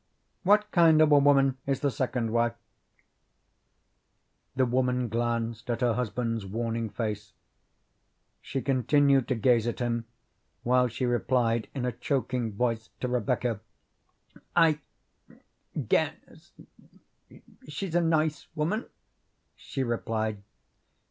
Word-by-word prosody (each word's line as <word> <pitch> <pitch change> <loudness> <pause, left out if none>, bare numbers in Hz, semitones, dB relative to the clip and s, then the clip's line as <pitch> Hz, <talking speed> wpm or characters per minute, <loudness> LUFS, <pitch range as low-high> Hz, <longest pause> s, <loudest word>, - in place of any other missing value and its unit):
"What 210 +2 +3
kind 165 -3 +5
of 155 -1 +5
a 145 - +7
woman 135 -2 +4
is 135 -2 0
the 140 - +1
second 120 -3 -2
wife?" 115 0 +1 2.0
The 130 -1 +3
woman 125 0 0
glanced 115 0 -2
at 120 0 -1
her 120 -2 +3
husband's 115 -1 -2
warning 115 +3 -3
face. 105 -2 -4 1.1
She 135 - -4
continued 135 0 +3
to 130 - 0
gaze 115 0 +3
at 120 - -2
him 120 -1 -2 0.6
while 125 +1 +3
she 125 +2 -3
replied 120 -2 +1
in 130 -2 -2
a 125 - 0
choking 125 -3 -2
voice 115 0 -1
to 125 - -2
Rebecca: 120 -2 -1 1.0
"I 160 -3 +4 1.1
guess - - -2 1.2
she's 160 +4 -5
a 175 - +3
nice 160 -2 0
woman," 170 +10 -1 0.7
she 135 - -4
replied. 110 -3 -2
125 Hz, 115 wpm, -28 LUFS, 115-140 Hz, 2.0 s, a